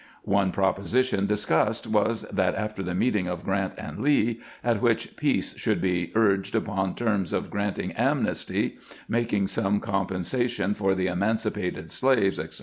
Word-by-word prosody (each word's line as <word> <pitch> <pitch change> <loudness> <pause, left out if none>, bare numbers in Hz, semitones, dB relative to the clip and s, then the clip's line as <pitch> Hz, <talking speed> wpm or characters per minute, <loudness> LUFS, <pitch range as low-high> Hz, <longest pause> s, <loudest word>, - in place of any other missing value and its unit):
One 100 -1 +2
proposition 100 +3 +1
discussed 105 0 +1
was 110 +1 +1
that 95 -2 +1
after 105 -2 -3
the 90 -1 -3
meeting 105 -3 +1
of 90 -1 -4
Grant 95 0 -1
and - - -7
Lee, 120 -5 +2 0.2
at 115 -4 +1
which - - +1
peace - - 0
should - - +1
be 90 -2 0
urged 100 -2 +2
upon 95 -4 -1
terms 100 -7 0
of - - -2
granting 100 0 -2
amnesty, - - 0 0.3
making 115 -4 +1
some 100 +1 +1
compensation 100 +4 -1
for 95 -2 +1
the 95 0 0
emancipated 100 -2 -1
slaves, 125 -8 +2
etc. - - -5
100 Hz, 145 wpm, -26 LUFS, 95-110 Hz, 0.3 s, One